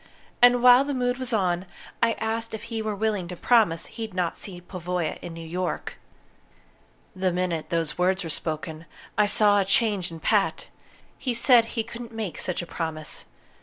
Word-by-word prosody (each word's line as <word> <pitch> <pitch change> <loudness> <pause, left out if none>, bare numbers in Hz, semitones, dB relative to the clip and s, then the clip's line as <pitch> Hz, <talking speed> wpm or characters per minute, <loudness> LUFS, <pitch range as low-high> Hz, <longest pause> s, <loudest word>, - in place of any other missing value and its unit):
And 245 0 +6
while 250 +1 +8
the 285 0 -3
mood 245 0 0
was 255 -2 -2
on, 185 -4 0 0.3
I 230 -1 +4
asked 225 0 -3
if 215 - -8
he 225 - -1
were 215 -1 -2
willing 205 -3 -1
to 180 - -6
promise 190 -6 +3
he'd 220 -4 -7
not 180 -2 0
see 185 -3 -7
Pavoya 180 -2 -4
in 175 - -7
New 165 0 -8
York. 180 +2 -4 1.2
"The 185 0 0
minute 175 -3 -2
those 165 0 -2
words 185 +1 +2
were 165 - -4
spoken, 155 +1 -4 0.3
I 210 - +3
saw 205 -1 +5
a - - +3
change 200 -1 +2
in 165 -1 -9
Pat. - - +1 0.5
He 250 -3 -1
said 235 -1 +6
he 225 - +1
couldn't 235 +1 -9
make 215 -6 -4
such 180 -1 -2
a - - -7
promise. 160 -2 -4
190 Hz, 180 wpm, -25 LUFS, 175-225 Hz, 1.2 s, while